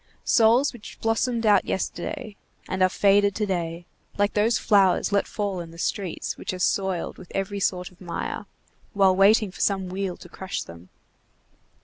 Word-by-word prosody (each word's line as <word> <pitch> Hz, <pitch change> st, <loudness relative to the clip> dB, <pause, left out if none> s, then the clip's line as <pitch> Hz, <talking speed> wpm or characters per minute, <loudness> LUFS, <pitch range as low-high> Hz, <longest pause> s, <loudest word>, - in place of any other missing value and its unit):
Souls 235 Hz, +5 st, +4 dB
which 230 Hz, -4 st, -11 dB
blossomed 225 Hz, +1 st, 0 dB
out 205 Hz, -3 st, +5 dB
yesterday, 225 Hz, +3 st, -4 dB, 0.3 s
and 185 Hz, -, -3 dB
are 185 Hz, -, +5 dB
faded 200 Hz, +1 st, +3 dB
to 215 Hz, -, 0 dB
day, 175 Hz, -3 st, -3 dB, 0.3 s
like 205 Hz, 0 st, +1 dB
those 220 Hz, +3 st, +2 dB
flowers 200 Hz, -2 st, +3 dB
let 200 Hz, 0 st, +1 dB
fall 200 Hz, -3 st, -3 dB
in 170 Hz, -1 st, -7 dB
the 165 Hz, -, -13 dB
streets, 185 Hz, 0 st, -3 dB
which -, -, -4 dB
are -, -, -4 dB
soiled 190 Hz, 0 st, -1 dB
with 180 Hz, -, -13 dB
every 195 Hz, +1 st, -2 dB
sort 180 Hz, -1 st, -1 dB
of 180 Hz, -, -23 dB
mire, 175 Hz, -2 st, -5 dB, 0.5 s
while 195 Hz, -2 st, +4 dB
waiting 200 Hz, +1 st, +4 dB
for -, -, -9 dB
some 190 Hz, -2 st, +1 dB
wheel 190 Hz, -1 st, -3 dB
to -, -, -13 dB
crush 190 Hz, -1 st, -5 dB
them. 85 Hz, +2 st, -13 dB
195 Hz, 170 wpm, -25 LUFS, 185-210 Hz, 0.5 s, out